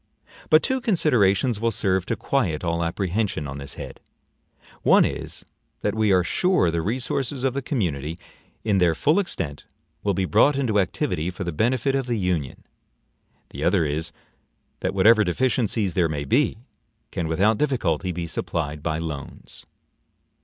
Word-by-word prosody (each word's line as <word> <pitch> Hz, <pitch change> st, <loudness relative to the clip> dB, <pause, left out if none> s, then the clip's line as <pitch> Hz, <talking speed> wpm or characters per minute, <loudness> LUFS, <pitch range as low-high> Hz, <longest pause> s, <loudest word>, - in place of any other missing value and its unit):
But 155 Hz, -, +6 dB
two 260 Hz, 0 st, 0 dB
considerations 125 Hz, -, +2 dB
will 115 Hz, +1 st, +1 dB
serve 95 Hz, -4 st, 0 dB
to -, -, 0 dB
quiet 95 Hz, -, -1 dB
all 85 Hz, -1 st, 0 dB
apprehension 90 Hz, -1 st, -1 dB
on 70 Hz, 0 st, -6 dB
this 70 Hz, 0 st, -7 dB
head: -, -, -8 dB, 0.8 s
one -, -, +5 dB
is, -, -, -4 dB, 0.4 s
that 105 Hz, -, 0 dB
we 110 Hz, -2 st, +2 dB
are 90 Hz, -1 st, +4 dB
sure 180 Hz, -, +2 dB
the 85 Hz, 0 st, -1 dB
resources 130 Hz, -, -2 dB
of 135 Hz, -2 st, +1 dB
the 140 Hz, -, -2 dB
community, 85 Hz, -, -2 dB, 0.5 s
in 105 Hz, -3 st, +2 dB
their 85 Hz, -3 st, +3 dB
full 150 Hz, -, +3 dB
extent, 85 Hz, -, -3 dB, 0.4 s
will 100 Hz, -2 st, 0 dB
be 95 Hz, 0 st, 0 dB
brought 125 Hz, +9 st, +4 dB
into 115 Hz, -7 st, +1 dB
activity 90 Hz, -3 st, -1 dB
for 90 Hz, +2 st, -5 dB
the 85 Hz, -, -3 dB
benefit 120 Hz, -, +1 dB
of 135 Hz, -2 st, -1 dB
the 120 Hz, -2 st, 0 dB
Union; 90 Hz, -9 st, -2 dB, 0.9 s
the -, -, -6 dB
other 80 Hz, -, +3 dB
is, 80 Hz, +3 st, -2 dB, 0.7 s
that -, -, -2 dB
whatever 110 Hz, +3 st, +6 dB
deficiences 110 Hz, -1 st, 0 dB
there 85 Hz, -2 st, +2 dB
may 75 Hz, -2 st, -3 dB
be, 130 Hz, +1 st, +2 dB, 0.5 s
can 85 Hz, -, -2 dB
without 100 Hz, +7 st, +2 dB
difficulty 95 Hz, -, 0 dB
be 85 Hz, 0 st, -4 dB
supplied 75 Hz, -2 st, -3 dB
by 80 Hz, 0 st, -1 dB
loans. 80 Hz, -4 st, -7 dB
95 Hz, 160 wpm, -24 LUFS, 85-120 Hz, 0.9 s, But